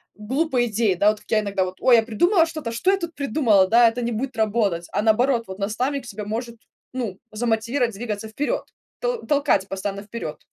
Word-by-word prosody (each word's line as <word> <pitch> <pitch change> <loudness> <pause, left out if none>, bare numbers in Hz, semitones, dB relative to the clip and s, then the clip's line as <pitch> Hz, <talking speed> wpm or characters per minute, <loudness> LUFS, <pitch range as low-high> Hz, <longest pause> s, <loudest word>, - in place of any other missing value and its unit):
глупой 250 +3 0
идеей. 215 -3 +1
Да, 205 +4 +4
вот 215 -1 -1
как - - -25
я 220 - +4
иногда 200 -2 -1
вот: 185 0 -7
"Ой, 255 -2 +6
я 225 - +3
придумала 330 - +3
что-то. 310 -8 -5
Что 365 +12 +1
я 395 - +2
тут 340 -3 -5
придумала, 230 -8 +3
да. 235 +2 +6
Это 235 +2 -5
не 235 0 -1
будет 240 +1 -4
работать". 205 -6 0
А - - +1
наоборот, 230 +3 +3
вот 190 +1 -8
наставник 250 +6 -2
тебя 215 -2 -6
может, 235 +3 -4 0.4
ну, 225 -7 -4
замотивировать 230 +2 0
двигаться 215 0 -5
вперед, 285 +7 -2 0.4
тол - - -2
толкать 280 - +2
постоянно 195 +1 -4
вперед. 225 +3 -7
230 Hz, 200 wpm, -23 LUFS, 210-260 Hz, 0.4 s, Ой